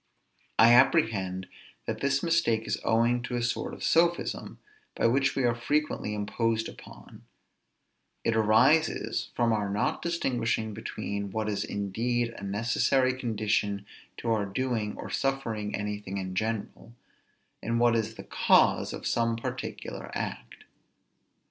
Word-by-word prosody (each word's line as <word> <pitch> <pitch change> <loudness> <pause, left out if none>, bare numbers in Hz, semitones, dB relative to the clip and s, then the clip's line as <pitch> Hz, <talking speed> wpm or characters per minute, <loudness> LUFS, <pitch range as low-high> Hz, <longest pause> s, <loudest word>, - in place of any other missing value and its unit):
I 115 +1 +8
apprehend 110 - +3 0.4
that - - -4
this 140 0 +1
mistake 120 -10 +2
is - - -1
owing 115 +2 +2
to 125 0 -4
a 120 - -1
sort 115 - -1
of - - -9
sophism, 170 +1 +1 0.4
by - - 0
which 135 +4 +3
we 135 - 0
are 120 -1 +3
frequently 130 -3 -1
imposed 110 +2 -1
upon; - - -13 1.0
it 115 - +1
arises 125 +9 +3
from 115 -1 +2
our 105 -2 0
not 100 +2 -1
distinguishing 120 -10 -1
between 100 -2 -4
what 110 +2 -2
is 105 -2 -1
indeed 115 +4 -1
a - - -10
necessary 115 +6 +1
condition 105 -4 -1 0.3
to 115 - -2
our 105 -3 +1
doing 110 -1 -2
or - - -7
suffering 115 -7 -1
anything 105 -1 -4
in 95 -1 -4
general, 110 +3 -3 0.7
and 115 +1 -1
what 120 -1 +4
is 110 -2 -1
the - - -9
cause - - +3
of - - -7
some 115 0 +1
particular 115 - -6
act. - - -5
115 Hz, 135 wpm, -28 LUFS, 105-125 Hz, 1.0 s, I